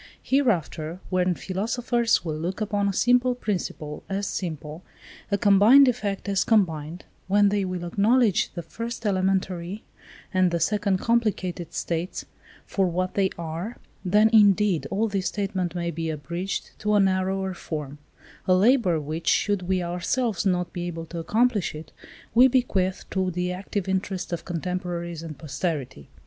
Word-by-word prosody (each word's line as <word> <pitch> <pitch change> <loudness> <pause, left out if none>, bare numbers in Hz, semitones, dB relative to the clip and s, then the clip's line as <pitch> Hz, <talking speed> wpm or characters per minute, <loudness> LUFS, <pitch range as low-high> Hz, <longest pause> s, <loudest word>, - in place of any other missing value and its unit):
Hereafter, 180 - 0
when 180 -1 +2
philosophers 230 +4 0
will 155 -2 -2
look 175 +5 -3
upon 205 -1 0
a - - +1
simple 245 +4 +3
principle 175 -9 -4
as 200 +1 -1
simple, 155 -4 -5 0.5
a 200 - +1
combined 210 +8 +7
effect 210 -6 -1
as 195 -1 +2
combined; 170 -6 0 0.2
when 205 +1 +4
they 205 0 0
will 180 -1 -4
acknowledge 210 +3 +2
the 170 - -4
first 230 +5 -6
elementary, 190 -1 -1 0.5
and 185 -1 +4
the 170 0 -1
second 200 +2 +1
complicated 190 -7 -1
states, 170 +2 -3 0.4
for 195 -2 0
what 185 +1 -1
they 195 -1 +2
are; 170 +7 -5 0.3
then, 210 +4 +4
indeed, 200 -7 +4
all 220 +3 0
this 195 -3 -1
statement 190 -4 -2
may 170 -1 -2
be 165 0 -3
abridged 170 +6 -4
to 210 0 +1
a - - +5
narrower 190 0 +1
form; 150 -4 -6 0.5
a 185 - +5
labour 200 -4 +4
which, 155 +2 -5
should 205 -2 +2
we 180 0 0
ourselves 195 +5 -1
not 180 -2 0
be 175 -1 -3
able 165 -1 -5
to 170 +1 -6
accomplish 215 0 +1
it, 155 0 -9 0.4
we 250 +3 +7
bequeath 205 -8 0
to 190 -1 0
the 180 +1 -2
active 195 +1 -4
interest 190 -1 -2
of 170 - -4
contemporaries 175 -1 -4
and 160 -3 -8
posterity. 140 - -4
185 Hz, 150 wpm, -25 LUFS, 170-205 Hz, 0.5 s, combined